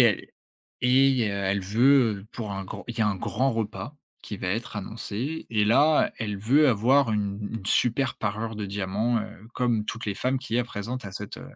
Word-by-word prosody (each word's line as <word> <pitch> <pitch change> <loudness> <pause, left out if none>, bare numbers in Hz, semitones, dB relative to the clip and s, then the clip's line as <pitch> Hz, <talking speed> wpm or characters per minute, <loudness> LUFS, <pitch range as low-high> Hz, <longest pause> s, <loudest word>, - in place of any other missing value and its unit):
et - - +9
elle - - +2 0.5
et 130 -2 +4
heu, - - -1
elle 100 0 0
veut 110 0 +3
pour 110 -4 -5
un 95 0 -4
grand - - -8
il 120 - -5
y - - 0
a 105 - +4
un 100 - -1
grand 130 +8 0
repas 115 +4 -4 0.3
qui 105 - -6
va 95 -1 -4
être 110 +3 -3
annoncé 115 +8 -4
et 105 -2 +2
là, 145 +8 +4
elle 105 -2 -3
veut 135 +9 +4
avoir 125 +2 +3
une 100 -2 -1
une 110 -4 -5
super 125 +4 +2
parure 110 +1 -3
de 105 - -3
diamants. 100 +4 0
Heu, 105 0 -9
comme 120 -4 +1
toutes 115 +1 -5
les 100 - -1
femmes 130 +6 0
qu'il 125 -3 -3
y - - +3
a 125 - +1
présentes 120 +2 -5
à 100 - -7
cette, 105 +1 -7
heu, - - -9
110 Hz, 220 wpm, -26 LUFS, 100-125 Hz, 0.5 s, et